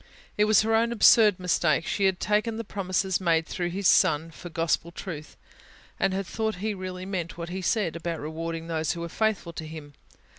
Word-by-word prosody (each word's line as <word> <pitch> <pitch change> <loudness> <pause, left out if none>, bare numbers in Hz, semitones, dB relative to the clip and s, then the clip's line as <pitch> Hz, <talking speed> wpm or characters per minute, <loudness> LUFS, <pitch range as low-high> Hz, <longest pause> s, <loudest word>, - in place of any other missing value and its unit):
It 210 - +3
was 215 0 +5
her 225 +1 0
own 230 +1 +3
absurd 215 -3 +6
mistake: 170 -3 +1
she 200 - 0
had 190 -1 +2
taken 215 +2 0
the 230 - -3
promises 190 -2 -1
made 165 -2 +2
through 175 +1 -3
His 190 +2 0
Son, 160 +2 +3
for 175 - -10
gospel 165 0 -1
truth; 160 -4 -8 0.6
had 195 - +2
thought 220 +3 -2
He 210 +4 -2
really 185 -1 -6
meant 180 -4 -4
what 170 0 -5
He 190 +2 -4
said, 185 -4 0
about 170 0 -4
rewarding 165 +2 -5
those 160 -2 -1
who 170 - -6
were 170 - -4
faithful 215 -4 -1
to 160 -1 -7
Him. 155 -2 -9
180 Hz, 195 wpm, -26 LUFS, 165-205 Hz, 0.6 s, absurd